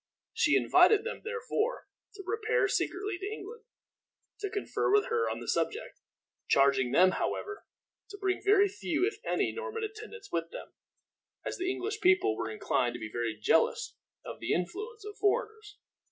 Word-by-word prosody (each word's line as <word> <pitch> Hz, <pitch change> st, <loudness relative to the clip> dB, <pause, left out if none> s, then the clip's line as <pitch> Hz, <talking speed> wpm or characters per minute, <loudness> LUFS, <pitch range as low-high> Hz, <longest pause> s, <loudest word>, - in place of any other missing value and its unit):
She 455 Hz, +1 st, +3 dB
invited 435 Hz, -1 st, +5 dB
them, 470 Hz, -, -5 dB
therefore, 470 Hz, 0 st, -2 dB, 0.3 s
to 395 Hz, -, -9 dB
repair 445 Hz, +2 st, +1 dB
secretly 395 Hz, 0 st, -1 dB
to 400 Hz, +2 st, -4 dB
England, 440 Hz, +2 st, -8 dB, 0.7 s
to 405 Hz, -1 st, -3 dB
confer 395 Hz, 0 st, -1 dB
with 415 Hz, +3 st, +3 dB
her 460 Hz, 0 st, +1 dB
on -, -, -3 dB
the -, -, -9 dB
subject; 445 Hz, +3 st, -2 dB, 0.5 s
charging 135 Hz, -2 st, +3 dB
them, 185 Hz, +6 st, +6 dB
however, 415 Hz, -, -3 dB, 0.4 s
to 405 Hz, -, -9 dB
bring 385 Hz, -2 st, -1 dB
very 405 Hz, 0 st, +5 dB
few, 360 Hz, -3 st, -1 dB
if 425 Hz, 0 st, -3 dB
any, -, -, 0 dB
Norman 455 Hz, -1 st, -5 dB
attendants 435 Hz, -, -8 dB
with 165 Hz, -1 st, -1 dB
them, -, -, -9 dB, 0.7 s
as -, -, -4 dB
the 365 Hz, +1 st, 0 dB
English 420 Hz, +3 st, -3 dB
people 370 Hz, +2 st, +4 dB
were -, -, -3 dB
inclined 270 Hz, -, 0 dB
to -, -, -6 dB
be 110 Hz, -1 st, -6 dB
very 115 Hz, -2 st, -2 dB
jealous -, -, +2 dB, 0.3 s
of -, -, -7 dB
the -, -, -1 dB
influence 420 Hz, -, -4 dB
of 415 Hz, -1 st, -8 dB
foreigners. 430 Hz, 0 st, -1 dB
415 Hz, 165 wpm, -30 LUFS, 365-440 Hz, 0.7 s, them